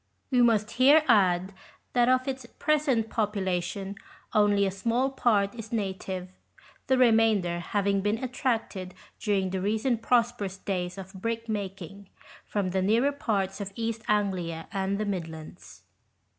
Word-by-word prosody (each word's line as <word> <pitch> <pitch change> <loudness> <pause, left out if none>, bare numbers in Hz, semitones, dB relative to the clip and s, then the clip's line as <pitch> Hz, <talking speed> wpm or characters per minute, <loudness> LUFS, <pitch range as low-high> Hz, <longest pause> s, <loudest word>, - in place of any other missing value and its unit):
We 250 -1 +4
must 220 -3 +3
here 285 +5 +6
add 190 -4 +3 0.4
that 245 0 +4
of 255 +1 +2
its 265 -1 -4
present 285 -7 +1
population 195 -2 -2 0.4
only 205 -1 +4
a 195 - 0
small 235 +7 0
part 210 -7 +2
is 225 -2 -9
native, 190 -4 -3 0.6
the 260 - +3
remainder 220 -8 +3
having 200 +2 0
been 210 +2 0
attracted 225 -7 -2 0.2
during 195 -4 0
the 190 -1 -2
recent 220 +4 0
pros 240 0 +3
perous 195 -4 -6
days 180 -2 -2
of 190 0 -9
brickmaking, 200 -3 -5 0.4
from 200 -3 -1
the 190 +1 0
nearer 230 +9 +3
parts 200 -8 -2
of 200 -1 -5
East 230 -1 -3
Anglia 185 -6 -1
and 195 0 -1
the 215 - -1
Midlands. 165 -5 -7
205 Hz, 140 wpm, -27 LUFS, 190-230 Hz, 0.6 s, here